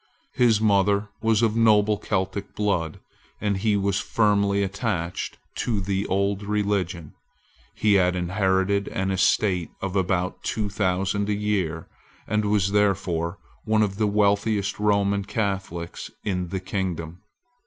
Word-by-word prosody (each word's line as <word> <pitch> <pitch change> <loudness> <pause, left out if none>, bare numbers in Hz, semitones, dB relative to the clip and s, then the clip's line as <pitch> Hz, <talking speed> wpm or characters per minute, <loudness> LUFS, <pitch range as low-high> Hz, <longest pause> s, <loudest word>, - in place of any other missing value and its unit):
His 115 -4 +4
mother 100 -1 +2
was 115 0 +2
of 110 -1 +2
noble 110 -2 +4
Celtic 100 0 -3
blood; 90 -7 -1 0.4
and 105 -2 0
he 105 +1 +1
was 100 -1 0
firmly 100 -2 +2
attached 95 -3 -3 0.2
to 115 -4 -1
the 100 +1 -1
old 100 +1 0
religion. 100 -5 -2 0.6
He 105 -1 +2
had 90 0 +1
inherited 95 +2 +1
an 95 0 -2
estate 95 -2 +2
of 95 0 -4
about 90 -1 0
two 105 -2 -2
thousand 100 +1 0
a - - +2
year, 95 -6 -1 0.4
and 105 0 0
was 100 -2 +2
therefore 95 -4 +1 0.3
one 110 0 +2
of 100 -2 -2
the 105 -1 +2
wealthiest 100 0 +1
Roman 100 -1 +2
Catholics 95 -5 -3
in 90 -3 -2
the 95 +2 -3
kingdom. 90 -3 -4
100 Hz, 130 wpm, -24 LUFS, 95-105 Hz, 0.6 s, His